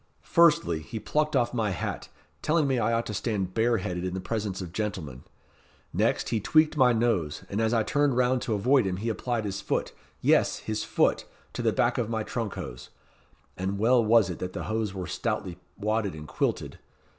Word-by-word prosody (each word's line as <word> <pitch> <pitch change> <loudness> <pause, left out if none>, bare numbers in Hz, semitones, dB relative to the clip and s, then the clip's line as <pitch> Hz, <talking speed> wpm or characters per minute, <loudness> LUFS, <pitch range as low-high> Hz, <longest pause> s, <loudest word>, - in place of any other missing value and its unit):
Firstly, 150 - +4
he 110 +9 -6
plucked 155 +5 0
off 120 -2 +2
my 110 -3 0
hat, 90 -5 -4 0.3
telling 155 -1 +2
me 135 -3 +1
I 115 +1 +1
ought 115 0 +1
to 105 - -5
stand 100 -3 -2
bareheaded 110 -6 0
in 90 0 -3
the - - -2
presence 100 0 -3
of 90 -3 -7
gentlemen. 90 - -4 0.7
Next, - - +1
he 115 - +1
tweaked 155 +8 +3
my 130 -4 +5
nose, 110 -10 0
and 100 +3 0
as 110 0 +2
I 115 -2 +2
turned 145 0 +1
round 125 0 +2
to 115 -4 -1
avoid 120 +2 +3
him, 90 -1 -2
he 110 +4 -2
applied 115 0 -2
his 100 -1 -3
foot - - -1 0.3
yes, - - +3
his 110 0 -3
foot - - +1 0.3
to - - -3
the - - +2
back - - +1
of 115 -2 -1
my 110 -1 -1
trunk 115 -2 -4
hose; 60 - -7 0.7
and 95 +2 -2
well 120 +3 +4
was 110 -3 +4
it 85 - -7
that 90 0 -4
the - - -4
hose 110 -1 -1
were 95 -2 -5
stoutly 90 +2 -3 0.2
wadded 105 -3 -1
and 75 -1 -9
quilted. - - -2
110 Hz, 200 wpm, -27 LUFS, 95-120 Hz, 0.7 s, my